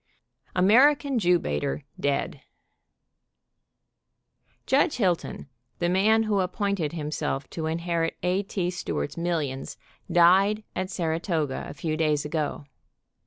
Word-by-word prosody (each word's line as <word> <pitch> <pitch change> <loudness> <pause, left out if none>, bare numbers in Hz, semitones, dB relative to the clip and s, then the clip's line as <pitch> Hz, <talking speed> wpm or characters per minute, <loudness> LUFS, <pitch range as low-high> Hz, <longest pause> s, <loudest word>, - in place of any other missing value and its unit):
tio 180 - +2
AMERICAN 275 +5 +5
JEW 180 -3 +4
BAITER 145 -3 -2 0.2
DEAD. 140 -1 -1 2.2
Judge 285 +4 +3
Hilton, 180 - -1 0.3
the 175 - 0
man 215 +5 +3
who 210 -2 +1
appointed 185 -3 -1
himself 150 -3 -3
to 160 -1 -3
inherit 165 0 -1
A. 180 +2 +1
T. 190 -3 -2
Stewart's 80 - -3
millions, 160 -6 -3 0.3
died 195 +5 +5
at 185 0 -2
Saratoga 160 -5 -2
a - - -8
few 155 +2 -2
days 155 -2 +1
ago. 150 -1 -3
175 Hz, 115 wpm, -26 LUFS, 155-195 Hz, 2.2 s, AMERICAN